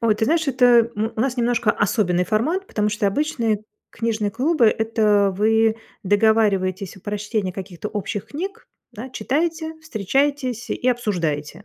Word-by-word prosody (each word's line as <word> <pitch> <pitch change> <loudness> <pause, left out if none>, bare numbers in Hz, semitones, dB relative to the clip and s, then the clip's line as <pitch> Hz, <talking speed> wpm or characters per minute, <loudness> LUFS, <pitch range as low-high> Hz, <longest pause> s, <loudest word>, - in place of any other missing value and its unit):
Ой, 225 -2 +3
ты 220 - 0
знаешь, 315 +2 +1
это, 255 -1 +2
э, 235 -1 +5
м, 220 +2 -1
у - - -1
нас 260 0 0
немножко 235 -2 +2
особенный 180 -3 +1
формат, 310 - 0
потому 210 -1 -1
что 210 -1 -1
обычные 225 -3 0 0.3
книжные 220 -3 -1
клубы- 280 - +2
это 215 -2 +2
вы 220 +1 +3 0.3
договариваетесь 200 -3 +2
о - - -14
прочтении 205 -1 -3
каких-то 190 +1 -7
общих 205 -1 -4
книг, 390 +10 -6 0.2
да, 240 +5 -8
читаете, 320 +4 -2
встречаетесь 260 - -1
и 250 - -1
обсуждаете. 175 -8 -2
220 Hz, 150 wpm, -22 LUFS, 205-255 Hz, 0.3 s, э